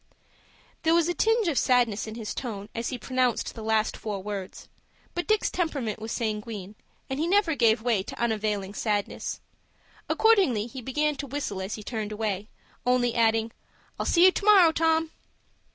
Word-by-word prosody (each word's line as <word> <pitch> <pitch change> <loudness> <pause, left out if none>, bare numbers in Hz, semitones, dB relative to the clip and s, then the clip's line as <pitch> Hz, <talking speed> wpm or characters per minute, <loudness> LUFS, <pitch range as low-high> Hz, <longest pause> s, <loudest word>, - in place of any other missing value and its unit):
There 325 0 +3
was 340 -1 +3
a 350 - 0
tinge 450 +1 +2
of 305 -6 +2
sadness 240 -4 +2
in 220 - -7
his 225 -2 -5
tone, 210 -5 -5
as 230 0 -3
he 255 - -4
pronounced 255 0 0
the 225 - -8
last 220 0 +1
four 205 -3 -5
words; 200 -2 -6 0.5
but 350 - -3
Dick's 430 0 +2
temperament 280 - -2
was 220 +1 -6
sanguine, 210 -3 -4 0.3
and 265 +1 -3
he 320 - 0
never 385 -2 +3
gave 225 -5 +3
way 235 -5 +2
to - - -9
unavailing 210 -4 -1
sadness. 205 -1 -2 0.7
Accordingly 385 - +3
he 255 +2 -8
began 295 +4 0
to 280 - -5
whistle 255 -8 -4
as 190 +2 -4
he 215 - -9
turned 215 -2 -4
away, 210 -1 -3 0.3
only 245 -1 +2
adding, 225 -1 +2 0.5
"I'll - - -1
see 345 - +4
you 375 - +8
to - - -4
morrow, 395 -5 +7
Tom." 320 0 +1
235 Hz, 175 wpm, -27 LUFS, 215-315 Hz, 0.7 s, you